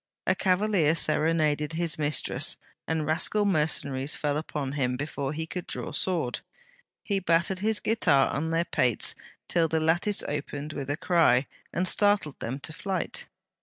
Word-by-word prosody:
'A 185 - +3
cavalier 185 -4 +2
serenaded 155 -1 +2
his 165 -2 -1
mistress, 150 0 0 0.3
and 160 -1 -1
rascal 185 +7 +2
mercenaries 150 -6 +1
fell 145 -1 -1
upon 150 -3 -3
him 125 -3 -1
before 140 -1 -3
he 160 +2 -3
could 175 +2 -6
draw - - -5
sword. 165 -10 -1 0.6
He 200 -2 0
battered 175 +1 +1
his 215 +1 +1
guitar 160 -11 +3
on 155 +3 -2
their 165 +1 +1
pates 120 -8 +1 0.3
till 170 -2 +2
the 160 0 0
lattice 170 +6 +1
opened 145 +1 -4
with 140 -2 -5
a 145 - -1
cry, 155 -8 +3 0.3
and 185 +1 0
startled 205 -6 +2
them 130 +4 -4
to 155 - -6
flight. 185 +1 -3
160 Hz, 155 wpm, -27 LUFS, 145-180 Hz, 0.6 s, A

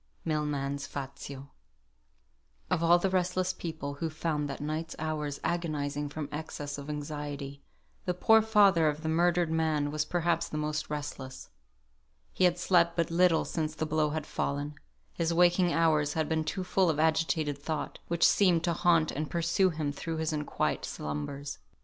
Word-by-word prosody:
MILMAN'S 145 -3 -1
"FAZIO." 140 0 -7 1.2
Of 180 -3 +2
all 170 +1 +6
the 185 +2 0
restless 185 0 +1
people 155 -5 -5
who 165 - 0
found 150 -2 -2
that 135 - -5
night's 155 +2 -3
hours 150 -2 -3
agonising 150 -4 -2
from 150 0 -5
excess 145 -1 -5
of 140 +1 -8
anxiety, 145 -1 -5 0.4
the 180 - 0
poor 220 +4 +5
father 200 -7 +5
of 150 +1 -4
the 160 - -1
murdered 175 0 +2
man 155 -3 +1
was 150 0 0
perhaps 170 +1 0
the 155 - -4
most 150 0 -2
restless. 145 -3 -6 0.8
He 185 - +3
had 175 -1 +3
slept 175 -1 +3
but 170 -1 0
little 170 -1 +4
since 155 -2 -2
the 160 - -2
blow 155 -1 +1
had 155 0 -3
fallen; 145 0 -2 0.4
his 165 0 0
waking 175 0 +4
hours 155 -3 +2
had 160 -2 0
been 160 -1 0
too 190 +3 -2
full 185 0 +2
of 155 -2 0
agitated 160 -2 +1
thought, 155 +2 -4
which 170 0 +3
seemed 180 -5 +4
to 170 - +1
haunt 165 -1 +3
and 155 +2 -3
pursue 170 +3 +2
him 155 -4 -2
through 160 +3 -4
his 160 0 -1
unquiet 150 -1 -1
slumbers. 75 - -5
155 Hz, 165 wpm, -30 LUFS, 145-170 Hz, 1.2 s, all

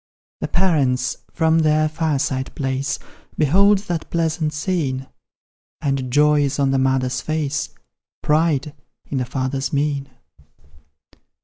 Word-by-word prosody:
The - - -2
parents, 140 -9 +1
from 160 0 +2
their 155 0 +3
fireside 145 -4 -1
place, 135 +1 -1 0.4
Behold 195 +8 +5
that 170 -2 -3
pleasant 160 -2 0
scene, 150 -5 -1 0.7
And 135 -2 -1
joy 150 +2 +4
is 140 0 0
on 140 -1 +2
the 135 - +2
mother's 130 -1 +1
face, 155 -1 -2 0.5
Pride 150 -2 +2 0.3
in 135 - -2
the 125 - -1
father's 130 +1 -2
mien. 140 -1 -1
145 Hz, 115 wpm, -21 LUFS, 135-155 Hz, 0.7 s, Behold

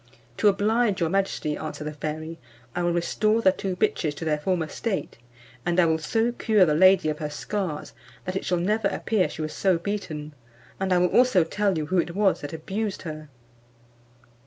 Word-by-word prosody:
"To - - +3
oblige 210 +1 +2
your 165 -2 0
majesty," 195 -6 0
answered 155 -1 -6
the 150 - -4
fairy, 155 +2 -5 0.4
"I 175 - 0
will 175 0 +1
restore 215 +6 +1
the 190 -4 +5
two 190 0 -4
bitches 155 -4 0
to 165 - -6
their 150 -1 +1
former 170 0 0
state, 195 - -4 0.4
and 175 +1 +1
I 175 - +6
will 160 -1 +2
so 225 +9 0
cure 220 -5 +3
the 155 - +2
lady 185 +2 +5
of 150 - -3
her 150 - -3
scars, 165 +1 -4 0.3
that 185 - -3
it 190 - -2
shall 180 - 0
never 210 +4 +1
appear 205 -2 0
she 160 - -5
was 155 0 -4
so 190 -3 +2
beaten; 165 -6 -5 0.5
and 190 0 -1
I 180 - +5
will 180 0 +3
also 245 -8 +5
tell 195 +2 0
you 155 - -1
who 185 +4 +1
it 170 +1 -2
was 200 -2 +2
that 145 - -6
abused 195 +6 -4
her." 155 -3 -7
180 Hz, 200 wpm, -25 LUFS, 155-200 Hz, 0.5 s, I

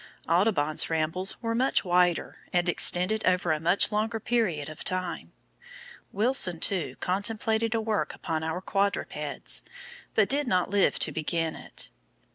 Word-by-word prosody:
Audubon's 165 -4 +2
rambles 160 +4 -1
were 230 0 -1
much 255 -1 +2
wider, 175 -1 +1
and 175 0 +1
extended 180 +4 +3
over 180 -2 +2
a 155 - 0
much 175 +7 +3
longer 220 +2 -1
period 205 -12 -1
of 155 - -9
time. 185 -2 -2 0.8
Wilson, 205 -5 +1
too, 160 -10 0
contemplated 220 +4 0
a 225 - 0
work 215 -8 -1
upon 160 -1 -3
our 160 +3 -3
quadrupeds, 200 +1 -2 0.5
but - - +4
did 285 0 +1
not 185 -3 +1
live 200 -1 +3
to - - +3
begin 165 0 -2
it. - - -6
185 Hz, 140 wpm, -27 LUFS, 165-220 Hz, 0.8 s, but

